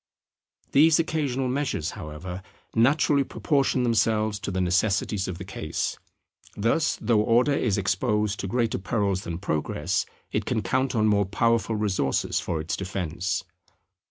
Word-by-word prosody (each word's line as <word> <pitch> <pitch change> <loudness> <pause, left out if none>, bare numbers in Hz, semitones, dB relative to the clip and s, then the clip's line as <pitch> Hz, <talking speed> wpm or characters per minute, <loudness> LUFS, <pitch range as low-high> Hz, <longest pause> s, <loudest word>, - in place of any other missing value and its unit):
These 155 +3 +6
occasional 145 -6 0
measures, 125 - -1
however, 85 +5 -7 0.3
naturally 140 +4 +3
proportion 135 -2 0
themselves 110 -2 +1
to 105 - -4
the 95 -1 -2
necessities 95 +2 +1
of 90 -2 -4
the 95 - -7
case. 80 -5 -3 0.6
Thus, 115 +9 +1
though 110 -1 +2
Order 120 +6 +3
is 110 -7 +1
exposed 105 +1 0
to 95 - -3
greater 115 +1 0
perils 100 -2 -1
than 85 -1 -4
Progress, 85 -1 -1 0.2
it - - -1
can 110 -4 -1
count 130 +6 0
on 110 -1 +3
more 100 -2 +3
powerful 115 +2 +1
resources 100 -10 0
for 80 - -2
its 80 +3 -2
defence. 95 -1 -3
105 Hz, 140 wpm, -26 LUFS, 95-125 Hz, 0.6 s, These